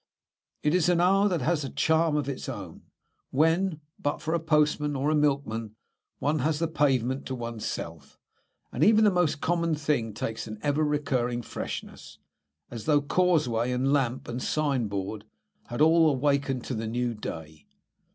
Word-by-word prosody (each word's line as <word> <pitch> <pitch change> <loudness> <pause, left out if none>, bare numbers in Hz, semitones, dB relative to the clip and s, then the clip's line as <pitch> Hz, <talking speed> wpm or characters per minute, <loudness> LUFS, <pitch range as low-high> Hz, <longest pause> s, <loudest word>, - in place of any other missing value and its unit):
It 150 - +2
is 180 -1 +3
an 175 -1 +3
hour 195 +3 +4
that 175 -5 -1
has 155 +1 +1
a 135 - -4
charm 160 +2 +2
of 150 -2 -1
its 135 -1 -4
own, 100 -9 -7 0.5
when, 165 +3 +1 0.2
but 145 - -1
for 160 - -3
a 170 - +2
postman 150 -2 +1
or 140 +3 0
a - - +2
milkman, 135 -7 0 0.4
one 150 +2 0
has 150 +3 +1
the 165 +1 0
pavement 135 -4 0
to 130 - -3
oneself, 110 - -6 0.5
and 130 - 0
even 220 +3 +6
the 210 - +5
most 175 -5 +1
common 170 -1 +1
thing 140 -8 -1
takes 115 +1 -4
an 110 0 -7
ever 145 +1 +1
recurring 130 -5 0
freshness, - - -7 0.5
as 115 -3 -7
though 150 -2 +4
causeway, 145 -7 +1
and 130 +3 +1
lamp, 130 -3 0
and 120 +1 -4
signboard 110 -10 -1 0.4
had 120 +4 -4
all 160 -1 +5
wakened 135 -2 0
to - - -4
the 110 -1 -3
new 120 +1 -1
day. 80 -7 -8
145 Hz, 165 wpm, -27 LUFS, 120-155 Hz, 0.5 s, even